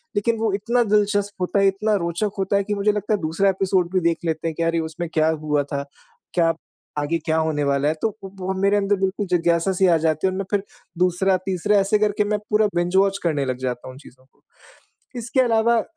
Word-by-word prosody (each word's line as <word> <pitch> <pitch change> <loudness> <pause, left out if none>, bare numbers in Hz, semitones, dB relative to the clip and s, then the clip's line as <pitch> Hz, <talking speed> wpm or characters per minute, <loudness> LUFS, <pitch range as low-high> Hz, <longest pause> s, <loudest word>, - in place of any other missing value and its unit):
लेकिन 225 +3 +1
वो 220 -1 +1
इतना 235 +5 +1
दिलचस्प 205 -2 0
होता 180 +2 +1
है, 195 - +4
इतना 210 +2 +1
रोचक 170 +5 -1
होता 195 +1 0
है 200 - +1
कि 210 +1 -3
मुझे 205 +1 +2
लगता 210 +1 -2
है 210 - +1
दूसरा 165 +5 +1
एपिसोड 190 -2 0
भी 185 - +3
देख 165 - -1
लेते 160 0 -1
हैं 160 - -3
कि 170 - -1
अरे, 165 0 +1
उसमें 160 +1 -4
क्या 155 0 +3
हुआ 150 -1 +1
था? 140 0 -4 0.5
क्या 165 -2 +3 0.5
आगे 145 +3 0
क्या 160 -1 +1
होने 160 -2 0
वाला 140 0 +1
है, 155 - +2
तो 225 - +2
वो 190 -1 -5
मेरे 200 +1 +3
अंदर 205 0 +2
बिल्कुल 195 +1 -1
जिज्ञासा 170 0 +2
सी 190 +1 +2
आ 175 - +5
जाती 160 +2 +1
है 185 - 0
और 185 - -4
मैं 195 - -3
फिर 205 -2 +1 0.3
दूसरा-तीसरा 185 +2 +1
ऐसे 200 +2 +3
करके 210 0 +1
मैं 210 0 -1
पूरा 210 0 +3
बिंज 175 +1 0
वॉच 195 0 +3
करने 150 -5 0
लग 130 -1 -2
जाता 125 -1 -4
हूँ 130 - -8
उन - - -14
चीज़ों 130 -2 -17
को। - - -36 0.8
इसके 235 +3 0
अलावा 230 -1 +3
190 Hz, 230 wpm, -22 LUFS, 165-205 Hz, 0.8 s, आ